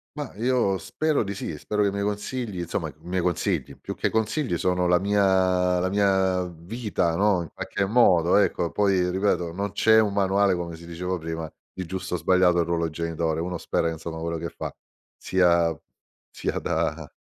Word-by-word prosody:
Mah, 145 -5 -5
io 115 -4 +1
spero 155 - 0
di 100 0 -4
sì, 80 -5 -5
spero 105 +6 -1
che - - +3
i - - 0
miei 100 0 -2
consigli, 105 0 -3
insomma 85 - -3
i - - -13
miei 90 +1 -2
consigli, 85 -2 -1
più - - -6
che - - 0
consigli 110 - 0
sono 90 0 +1
la 90 0 +4
mia 95 -2 +2
la 90 - 0
mia 95 -2 +2
vita, 85 0 -2
no, 100 -2 +2
in 80 - -10
qualche 100 - -2
modo, 95 -6 +4
ecco, 85 -5 +2
poi 95 -2 +2
ripeto 90 -3 0
non 100 +2 -3
c'è 110 +2 +5
un 105 -2 0
manuale, 100 0 +2
come 85 -1 -4
si 85 +1 -12
diceva 90 +2 -3
prima, 80 -1 -5 0.2
di 95 -1 -6
giusto 95 0 -4
o - - 0
sbagliato, 90 +1 +3
il 85 - +2
ruolo 85 -1 0
genitore. 80 0 -2
Uno 90 +1 -3
spera, 85 - -1
insomma, 80 0 -6
quello 85 0 -3
che 85 +1 -4
fa - - -7 0.4
sia 85 -3 +2 0.6
sia - - -3
da - - -2
90 Hz, 190 wpm, -25 LUFS, 85-100 Hz, 0.6 s, c'è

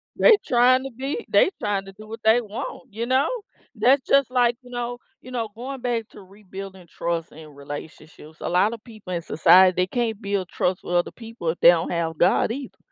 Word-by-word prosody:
They - - +6
trying 255 +2 +4
to 270 - -6
be 270 - -5
they - - +4
trying 200 -2 -1
to 195 - -10
do 215 +2 -13
what 225 +1 -8
they 225 +2 +5
want, 210 -1 -8
you 230 +2 -3
know, 260 +4 +2 0.5
that's 255 +5 +4
just 275 -3 +3
like, 240 -2 +3
you 250 - -16
know 245 0 -4 0.3
you 255 - -11
know, 230 -3 -3
going 260 +2 -7
back 235 -3 -2
to 205 - -14
rebuilding 195 -1 -11
trust 170 0 -3
in 155 0 -12
relationships. 150 +2 -10
A - - -5
lotta 205 +6 +2
people 215 -5 -10
in 170 - -2
society, 185 +3 +5
they 180 +1 +1
can't 225 -1 -2
build 200 -2 -2
trust 180 +1 -2
with 175 - -5
other 175 - +1
people 225 -7 -6
if 165 - -3
they - - +8
don't 170 -1 +2
have 165 -2 -2
God 185 +5 +3
either, 270 +1 -7
215 Hz, 210 wpm, -23 LUFS, 180-245 Hz, 0.5 s, they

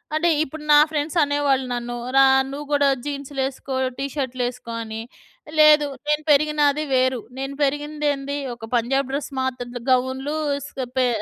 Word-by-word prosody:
అంటే 335 +2 +2
ఇప్పుడు 310 +1 -8
నా 295 - +8
ఫ్రెండ్స్ 305 +1 -2
అనేవాళ్ళు 285 -2 +1
నన్ను 240 0 -4 0.2
"రా 270 0 +7 0.2
నువ్వు 285 +2 -6
కూడా 285 -1 +4 0.2
జీన్సులు 280 -1 -4
ఎస్కో. 270 0 -5 0.2
టి 275 - -2
షర్టులు 260 -3 -2
ఎస్కో" 245 -1 -9
అని. 220 0 -6 0.6
లేదు. 300 -1 +7 0.2
నేను 300 0 +1
పెరిగినాది 300 0 +3
వేరు. 255 -1 +2 0.2
నేను 270 +1 -4
పెరిగిందేంది 290 0 -1 0.2
ఒక 225 -1 -10
పంజాబ్ 265 +3 +1
డ్రెస్ 285 +1 -3
మాత్ర 260 -1 -2
త - - -5
గౌన్లు 260 +3 0 0.3
స్ - - -11 0.3
పే 255 -1 +4
275 Hz, 155 wpm, -22 LUFS, 260-295 Hz, 0.6 s, నా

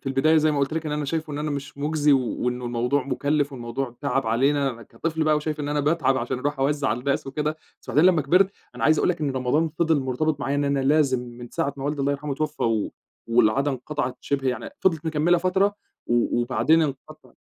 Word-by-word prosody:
في - - -20
البداية 145 +4 +3
زي 155 0 +4
ما 145 - 0
قُلت 140 +1 0
لك 160 0 -2
إن 150 - -2
أنا 150 0 -2
شايفه 155 +1 -3
إن 145 - -4
أنا 150 0 -2
مش 140 0 -5
مُجزي 150 0 +2
وإنّه 125 -1 0
الموضوع 125 +4 0
مُكلِّف 145 +1 0
والموضوع 120 0 -5
تعَب 140 -2 0
علينا، 135 +1 +1
كطفل 160 +7 -3
بقى 155 -1 +3
وشايف 150 0 -3
إن 145 - -3
أنا 145 0 0
باتعَب 145 -3 +2
عشان 125 +1 -3
أرُوح 145 +2 -2
أوزّع 140 0 +1
على 115 - 0
الناس 140 +2 -1
وكده، 150 +3 -2 0.3
بس - - -23
وبعدين 155 +5 +4
لمّا 165 -4 +1
كبِرت، 180 +7 +4 0.2
أنا - - -3
عايز 155 -1 +4
أقول - - +2
لك 175 -2 -1
إن 145 -2 0
رمضان 130 +5 +1
فضِل 160 -3 +3
مرتبِط 140 +3 -1
معايا 140 +1 -1
إن 145 - +1
أنا 140 -1 +1
لازم 135 -2 +3
من 120 0 -9
ساعة 140 - -2
ما 135 - -6
والدي 145 0 -2
الله 140 +1 +1
يرحمه 140 +1 -4
اتوفّى 150 +2 -3
و 110 -2 0 0.3
والعادة 120 +4 +3
انقطَعت 130 0 -3
شِبه 135 -2 -1
يعني 120 -2 -3
فضلِت 165 -4 +1
مكمّلة 160 +3 +2
فترة 190 +3 +1 0.3
و 120 0 +1
وبعدين 155 +6 +3
انقطعِ 140 -3 -6
145 Hz, 225 wpm, -24 LUFS, 130-155 Hz, 0.3 s, زي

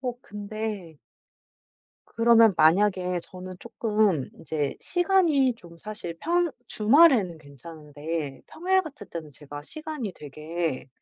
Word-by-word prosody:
어 245 -2 -4
근데. 205 - -6 1.1
그러면 230 -2 +5
만약에 180 +2 +3
저는 185 +1 -8
쪼끔 210 - 0
인제 150 -3 -3
시간이 345 -8 +2
좀 170 -6 -15
사실 190 -4 -7
평 345 +1 +1 0.2
주말에는 220 - +4
괜찮은데 150 0 -7
평일 375 +3 +1
같을 270 - -10
때는 160 -3 -7
제가 145 +1 -9
시간이 300 - -6
되게 155 -1 -4
195 Hz, 235 characters per minute, -26 LUFS, 160-245 Hz, 1.1 s, 그러면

